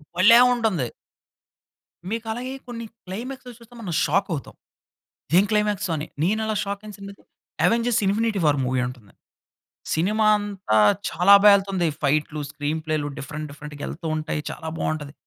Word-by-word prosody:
భలే 215 +7 +7
ఉంటుంది! 210 - 0 1.2
మీకు 225 +1 -3
అలాగే 250 +3 -4
కొన్ని 230 -1 -6 0.2
క్లైమాక్స్‌లో 250 +7 -7
చూస్తే, 235 +1 -17
మనం 180 -6 -4
షాక్ 195 - +1
అవుతాం. 140 - -6 0.8
ఇది 170 - +4
ఏం 200 - +3
క్లైమాక్సు? 210 -2 +1
అని 150 - -4 0.2
నేను 210 +5 +1
అలా 215 -1 -1
షాక్ 200 0 -4
అయిన 210 - -9
సినిమా 200 0 -9
అయితే, - - -24 0.4
'అవెంజర్స్ 235 0 +2
ఇన్ఫినిటీ 215 +1 +1
వార్' 145 -2 +3
మూవీ 125 0 0
ఉంటుంది. 120 -6 -11 0.8
సినిమా 210 +7 +1
అంతా 200 - -1 0.3
చాలా 180 +4 +5
బా 210 - +9
ఎళ్తుంది. 195 -3 -1 0.2
ఫైట్‌లు, 150 +1 0
స్క్రీన్ 150 +1 -3
ప్లేలు 155 -2 -1
డిఫరెంట్, 150 +3 -6
డిఫరెంట్‌గా 145 0 -10
ఎళ్తూ 165 +1 -6
ఉంటాయి. 155 -1 -3
చాలా 160 - -8
బాగుంటది. 150 -2 -3
190 Hz, 155 wpm, -23 LUFS, 150-215 Hz, 1.2 s, బా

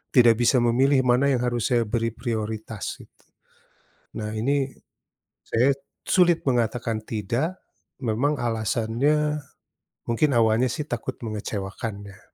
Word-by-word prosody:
tidak 120 -3 +6
bisa 125 +2 +4
memilih 130 +3 +3
mana 130 +3 +4
yang 130 - +2
harus 120 -1 -1
saya 120 -1 +3
beri 115 +1 0
prioritas 110 -2 -4
gitu. - - -18 0.9
Nah 105 0 -3
ini, 135 +4 +1 0.7
saya 125 +5 +3 0.3
sulit 175 -3 +3
mengatakan 115 -2 0
tidak, 115 - -2 0.4
memang 125 +6 +1
alasannya, 120 +7 0 0.7
mungkin 130 +6 +2
awalnya 115 +2 +3
sih 150 +3 -4
takut 120 -4 -4
mengecewakan 100 -1 -5
ya, 100 -1 -13
120 Hz, 115 wpm, -25 LUFS, 110-135 Hz, 0.9 s, tidak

